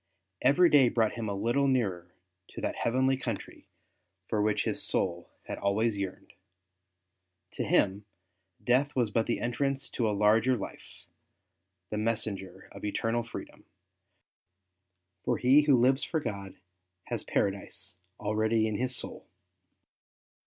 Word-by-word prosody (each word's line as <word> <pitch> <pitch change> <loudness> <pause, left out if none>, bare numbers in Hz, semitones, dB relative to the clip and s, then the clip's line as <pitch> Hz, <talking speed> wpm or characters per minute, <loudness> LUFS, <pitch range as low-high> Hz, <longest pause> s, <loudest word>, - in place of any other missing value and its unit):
Every 175 +6 +5
day 140 -6 +6
brought 115 -3 +2
him 115 -2 -4
a 100 - -2
little 120 +7 +1
nearer 95 -9 -1 0.3
to - - -9
that - - -2
heavenly 130 +3 +2
country - - -6 0.6
for 105 - 0
which 105 0 +1
his - - -2
soul 85 -2 -1
had - - -6
alvv^ays 105 +3 +1
yearned. 95 -2 -6 1.2
To - - -3
him 100 +1 +2 0.6
death 130 +4 +2
was 120 -5 +1
but 115 +1 +1
the 120 - 0
entrance 135 +2 -1
to 115 -3 0
a - - +1
larger 110 +5 +4
life, 100 - -9 0.9
the 105 - -1
messenger 105 -4 -3
of - - -11
eternal 115 +3 0
freedom, 115 - -9 1.6
for - - +1
he 130 +4 +6
who 145 -3 +4
lives 130 +3 +3
for 160 - -1
God 100 -8 -5 0.5
has - - -4
Paradise 95 -1 -2 0.2
already 110 +1 +1
in 105 -1 -2
his 130 +2 +1
soul. - - -7
115 Hz, 135 wpm, -29 LUFS, 100-130 Hz, 1.6 s, day